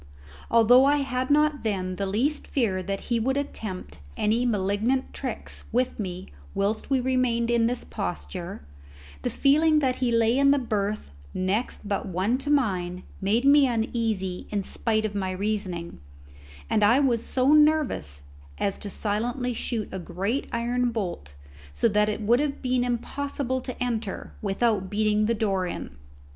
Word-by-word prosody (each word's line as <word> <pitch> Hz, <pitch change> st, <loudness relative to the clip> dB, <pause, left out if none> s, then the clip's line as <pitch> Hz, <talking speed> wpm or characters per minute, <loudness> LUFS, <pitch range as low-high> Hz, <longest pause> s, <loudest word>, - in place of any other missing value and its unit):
Although 235 Hz, +3 st, +6 dB
I 290 Hz, +1 st, +4 dB
had 255 Hz, -2 st, -2 dB
not 295 Hz, 0 st, +3 dB
then 185 Hz, -4 st, -1 dB
the 195 Hz, -, -1 dB
least 255 Hz, +10 st, 0 dB
fear 210 Hz, -9 st, 0 dB
that 195 Hz, +1 st, -3 dB
he 235 Hz, -1 st, -1 dB
would 265 Hz, +4 st, 0 dB
attempt 190 Hz, -, -5 dB, 0.2 s
any 230 Hz, +4 st, +2 dB
malignant 215 Hz, +5 st, 0 dB
tricks 260 Hz, -4 st, -5 dB
with 250 Hz, +1 st, 0 dB
me 185 Hz, -2 st, -5 dB, 0.3 s
whilst 205 Hz, +5 st, -1 dB
we 270 Hz, -2 st, +3 dB
remained 245 Hz, -2 st, +1 dB
in 235 Hz, -1 st, +3 dB
this 245 Hz, +1 st, -2 dB
posture, 75 Hz, -4 st, -5 dB, 0.6 s
the -, -, -1 dB
feeling 305 Hz, +3 st, +4 dB
that 265 Hz, -4 st, +1 dB
he 250 Hz, -2 st, 0 dB
lay 230 Hz, +2 st, +3 dB
in 280 Hz, 0 st, +5 dB
the 285 Hz, -, +5 dB
berth 210 Hz, -, -2 dB, 0.2 s
next 200 Hz, +4 st, -1 dB
but 200 Hz, 0 st, -1 dB
one 195 Hz, +7 st, 0 dB
to 280 Hz, +1 st, -4 dB
mine 185 Hz, -10 st, 0 dB, 0.2 s
made 215 Hz, +6 st, +1 dB
me 280 Hz, 0 st, +6 dB
uneasy 220 Hz, -5 st, -1 dB
in 205 Hz, -2 st, -1 dB
spite 220 Hz, +2 st, 0 dB
of 210 Hz, -, -3 dB
my 195 Hz, -2 st, -2 dB
reasoning; 185 Hz, -3 st, -3 dB, 0.7 s
and 210 Hz, -, +2 dB
I 235 Hz, +6 st, +5 dB
was 245 Hz, -5 st, +2 dB
so 260 Hz, +3 st, +2 dB
nervous 300 Hz, -, +2 dB, 0.3 s
as 200 Hz, -1 st, -1 dB
to 205 Hz, -, -5 dB
silently 240 Hz, +5 st, -1 dB
shoot 225 Hz, -1 st, -2 dB
a 190 Hz, -, -4 dB
great 195 Hz, +9 st, -2 dB
iron 240 Hz, +1 st, 0 dB
bolt, 175 Hz, -, -4 dB, 0.4 s
so -, -, +2 dB
that 210 Hz, 0 st, +2 dB
it 210 Hz, +1 st, -3 dB
would 235 Hz, +4 st, +3 dB
have 285 Hz, -1 st, -2 dB
been 250 Hz, -1 st, +1 dB
impossible 260 Hz, +2 st, -2 dB
to 250 Hz, -1 st, -4 dB
enter 225 Hz, -5 st, -3 dB
without 200 Hz, -1 st, 0 dB
beating 210 Hz, 0 st, +2 dB
the 230 Hz, -, +1 dB
door 195 Hz, -4 st, 0 dB
in. -, -, -5 dB
225 Hz, 160 wpm, -26 LUFS, 200-255 Hz, 0.7 s, Although